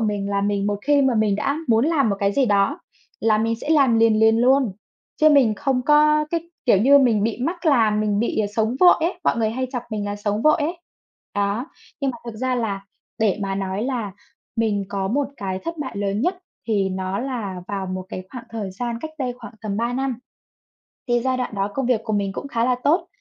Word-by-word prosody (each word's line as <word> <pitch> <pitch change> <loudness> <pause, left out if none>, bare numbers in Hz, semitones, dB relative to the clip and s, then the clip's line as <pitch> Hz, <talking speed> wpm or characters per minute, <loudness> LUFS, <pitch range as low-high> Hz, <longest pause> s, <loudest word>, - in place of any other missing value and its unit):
mình 205 -2 -1
là 200 0 +1
mình, 200 0 0
một 205 -1 -1
khi 290 0 +3
mà 265 -2 +2
mình 215 -2 +2
đã 280 +8 -1
muốn 225 +1 +4
làm 310 -7 +2
một 200 - 0
cái 200 0 +2
gì 270 +3 +2
đó 205 - +2 0.4
là 220 -1 +3
mình 225 +1 +1
sẽ - - -7
làm 275 -7 +4
liền 225 -1 +4
liền 220 0 +5
luôn. 255 -2 +3 0.4
Chứ 310 - +5
mình 265 -7 +4
không 265 0 0
có 300 +2 +4
cái 335 0 -3 0.2
kiểu 220 -6 +5
như 275 +7 +6
mình 235 -6 +3
bị 225 +1 -1
mắc 340 +6 -3
làm, 225 -8 +3
mình 210 -1 0
bị 220 -1 0
sống 220 +3 +1
vội 360 - +8
ấy. 350 +2 -1
Mọi - - +2
người 220 -2 +1
hay 255 +3 -2
chọc 245 -3 -3
mình 210 -2 -3
là 205 0 -3
sống 205 +1 -2
vội 305 - +5
ấy. 330 +3 -2 0.6
Đó, 205 +5 -1 0.3
nhưng 275 -1 +1
mà 245 - -8
thực 230 -2 -7
ra 255 +2 -1
là 205 -5 -2 0.3
để 215 -2 +1
mà 195 -1 -2
nói 195 +1 -2
là 235 -6 -2 0.4
mình 210 -3 0
có 195 -1 -2
một 275 +5 0
cái 190 -4 -3
thất 335 0 -4
bại 265 -7 -5
lớn 200 0 -1
nhất, 360 +7 0 0.3
thì 200 -3 +1
nó 190 +1 -3
là 220 -9 -4
vào 195 -1 -3
một 185 0 -5
cái 185 - -6
khoảng 245 -2 -8
thời 215 -4 -4
gian 235 +4 -4
cách 315 - -6
đây 255 -2 -1
khoảng 245 - -10
tầm 205 -2 -3
3 235 +2 -1
năm. 265 0 -1 0.9
Thì 240 -1 +2
giai 260 +1 0
đoạn 250 -4 -3
đó 195 0 -1
công 270 - -1
việc 240 -3 +1
của 220 - -2
mình 200 -1 0
cũng 280 - -6
khá 235 -4 0
là 250 0 +2
tốt. 315 +6 +2
225 Hz, 235 wpm, -22 LUFS, 205-270 Hz, 0.9 s, vội